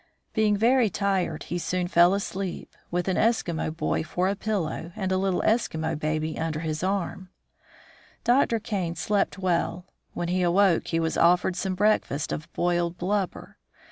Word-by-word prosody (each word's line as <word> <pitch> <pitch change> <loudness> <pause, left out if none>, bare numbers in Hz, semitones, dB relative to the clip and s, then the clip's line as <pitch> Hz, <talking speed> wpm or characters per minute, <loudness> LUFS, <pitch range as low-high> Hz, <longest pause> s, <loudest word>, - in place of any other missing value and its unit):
Being 215 -2 +2
very 235 +1 +4
tired, 190 -5 -1
he 175 - -3
soon 180 +1 -1
fell 175 +1 +5
asleep, 195 -2 -4
with 175 +1 -1
an 190 - +1
Eskimo 215 -9 +1
boy - - 0
for 180 +3 -1
a 200 - 0
pillow, 185 -6 -3
and 190 -2 -2
a 185 - +2
little 190 -1 0
Eskimo 160 -8 +1
baby 155 +1 -2
under 160 -1 -2
his 155 -1 -3
arm. 190 0 -2 0.9
Dr. 240 -1 +3
Kane 195 -7 -3
slept 205 +1 0
well. 180 -1 -1 0.3
When 175 - -2
he 185 +1 +1
awoke 180 0 +3
he 165 - 0
was 160 0 -1
offered 180 +2 +3
some 185 +1 -2
breakfast 190 -8 +1
of 155 - -5
boiled 175 0 0
blubber. 190 0 -2
180 Hz, 160 wpm, -26 LUFS, 170-200 Hz, 0.9 s, fell